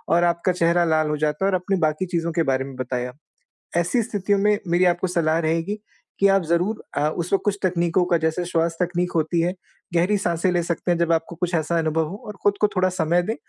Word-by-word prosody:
और 175 - +3
आपका 170 +1 +1
चेहरा 170 0 +2
लाल 155 -1 +2
हो 150 - -1
जाता 150 +5 0
है - - +3
और 185 - +2
अपनी 190 +2 0
बाकी 155 +3 0
चीज़ों 170 -2 -2
के 165 -1 +1
बारे 135 -1 0
में 135 -1 -9
बताया, 125 -1 -3 0.7
ऐसी 175 +8 +2
स्थितियों 200 -1 0
में 210 +1 +3
मेरी 175 +2 +3
आपको 175 +1 +2
सलाह 165 -2 +1
रहेगी 165 +4 -1 0.4
कि 200 - +5
आप 195 0 +4
ज़रूर 175 +7 0
अ, 150 - +2
उस 170 +2 -4
वक़्त 195 - +2
कुछ 200 -1 +1
तकनीकों 175 -1 +2
का 175 -1 +2
जैसे 160 +2 -1
श्वास 165 -1 0
तकनीक 180 0 0
होती 165 +1 +1
है, 175 +2 0 0.4
गहरी 180 +5 +3
साँसें 180 -2 0
ले 175 -1 +1
सकते 170 +1 -1
हैं 175 - +2
जब 170 -1 +1
आपको 165 +1 -2
कुछ 180 +1 -2
ऐसा 165 +1 0
अनुभव 160 0 0
हो 195 - -6
और 210 - -7
खुद 205 0 +2
को 210 - +5
थोड़ा 185 0 +3
समय 175 -1 +1
दें 225 +5 -2
170 Hz, 235 wpm, -23 LUFS, 160-185 Hz, 0.7 s, कि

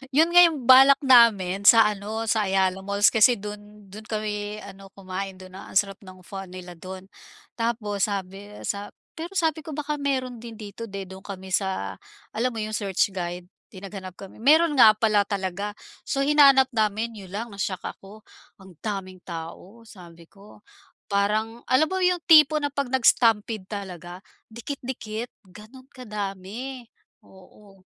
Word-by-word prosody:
Yun 320 +3 +5
nga 350 0 +8
yung 325 -4 0
balak 270 +2 +8
namin 205 -7 +4
sa 230 -1 +9
ano, 210 +2 -5
sa 215 -1 +2
Ayala 190 -1 +1
Malls. 200 +1 +3
Kasi 235 +2 +5
do'n 210 0 -10
do'n 215 +2 -10
kami 210 -1 -4
ano, 195 0 -12
kumain. 195 0 -6
Dun, 185 0 -13
a - - -11
ang - - +1
sarap 195 -1 0
ng 185 0 -13
"pho" 195 +2 -8
nila 180 -1 -10
dun. 185 +2 -9 0.5
Tapos 220 -4 -1
sabi 200 0 -6
sa 205 0 -4 0.3
pero 345 +4 -7
sabi 320 -4 +1
ko, 310 -1 -8
"baka 300 0 -3
meron 260 -4 -2
din 230 0 -10
dito." 215 +1 -9
'di 200 -1 -6
dun 190 0 -10
kami 190 -1 -8
sa 190 0 -2 0.3
alam 250 +3 -1
mo - - -4
yung 215 - -5
search 200 -1 0
guide? 175 -1 -5 0.2
'Di 190 -1 -13
naghanap 190 -2 -8
kami, 195 +2 -12
meron 310 +7 +4
nga 220 -3 +8
pala 210 -2 +2
talaga. 200 +1 -4 0.3
So, 275 -1 0
hinanap 275 -2 +5
namin, 220 0 -1
'yon 190 -2 -11
lang 230 +3 -4
na-shock 200 -2 -4
ako, 210 +2 -10 0.4
ang 185 -5 -17
daming 195 -3 -5
tao. 175 +6 -9
Sabi 175 -6 -14
ko, 200 +1 -18 0.5
parang 215 +3 0
alam 260 +5 +4
mo 375 - -1
yung 360 -2 +1
tipo 310 -2 +7
na 290 - -1
'pag 280 -1 -2
nag-stampede 225 -5 +2
talaga, 185 -3 -8 0.2
dikit-dikit, 235 -1 -6 0.2
ganun 215 +7 -15
kadami, 215 +2 -7 0.3
oo. 190 +1 -19
210 Hz, 160 wpm, -24 LUFS, 195-240 Hz, 0.5 s, sa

